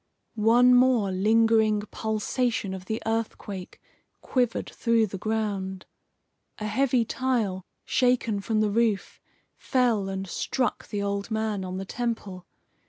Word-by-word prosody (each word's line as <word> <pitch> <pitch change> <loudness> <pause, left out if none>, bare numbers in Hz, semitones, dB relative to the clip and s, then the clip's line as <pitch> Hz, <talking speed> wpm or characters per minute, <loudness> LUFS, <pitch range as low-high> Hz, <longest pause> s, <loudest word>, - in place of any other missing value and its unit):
One 235 +3 +5
more 245 -5 +4
lingering 220 +2 +3
pulsation 220 -1 -1
of 185 -1 -7
the 220 +3 -3
earthquake 220 -4 -4 0.4
quivered 245 -3 0
through 230 -2 +2
the 195 -2 -7
ground. 200 -3 -2 0.7
A 215 - -5
heavy 240 +2 +2
tile, 225 -8 -1 0.2
shaken 245 -4 +1
from 215 +2 0
the 210 -1 +1
roof, 220 -2 0 0.4
fell 235 -7 +1
and 195 0 -3
struck 250 +6 -2
the 205 -2 -3
old 200 0 -2
man 220 -3 -1
on 185 0 -5
the 195 - -4
temple. 205 -6 -4
220 Hz, 125 wpm, -26 LUFS, 195-235 Hz, 0.7 s, One